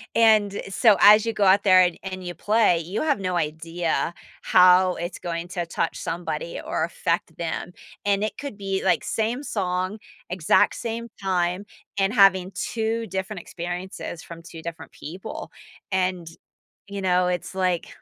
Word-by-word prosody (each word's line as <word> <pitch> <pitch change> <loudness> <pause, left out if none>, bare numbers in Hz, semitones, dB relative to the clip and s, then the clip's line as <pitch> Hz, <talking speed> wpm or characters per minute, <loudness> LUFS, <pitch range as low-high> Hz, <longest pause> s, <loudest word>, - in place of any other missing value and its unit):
And, 215 -3 +4
so, 210 0 +4
as 210 +2 +8
you 230 - 0
go 205 - 0
out 195 +2 +5
there, 185 -2 +7
and 180 -1 +2
and 185 -1 -6
you 175 - -4
play, 205 -2 +3
you 175 +6 -4
have 295 -7 +1
no 185 -1 -1
idea 165 +2 -2 0.3
how 180 0 +5
it's 175 +1 -5
going 170 0 -4
to 175 -2 -3
touch 165 - -2
somebody, - - -4
or - - -1
affect - - -2
them, - - -4 0.3
and 200 0 +2
it 215 - -3
could 280 -8 -7
be, 195 -1 -2
like, - - +2
same 230 +5 -1
song, 185 -1 -2 0.3
exact 180 -3 +3
same 235 0 -4
time, 180 0 0 0.3
and 195 +3 +2
having 195 -3 +5
2 225 +3 -2
different 190 +1 -4
experiences 175 0 -6
from 170 0 -10
2 165 -1 -10
different 170 +1 -8
people, 185 +8 -8 0.4
and, 180 -2 0 0.6
you 200 0 -5
know, 180 -1 +2
it's 180 +1 -3
like 185 -2 0
185 Hz, 160 wpm, -24 LUFS, 175-210 Hz, 0.6 s, as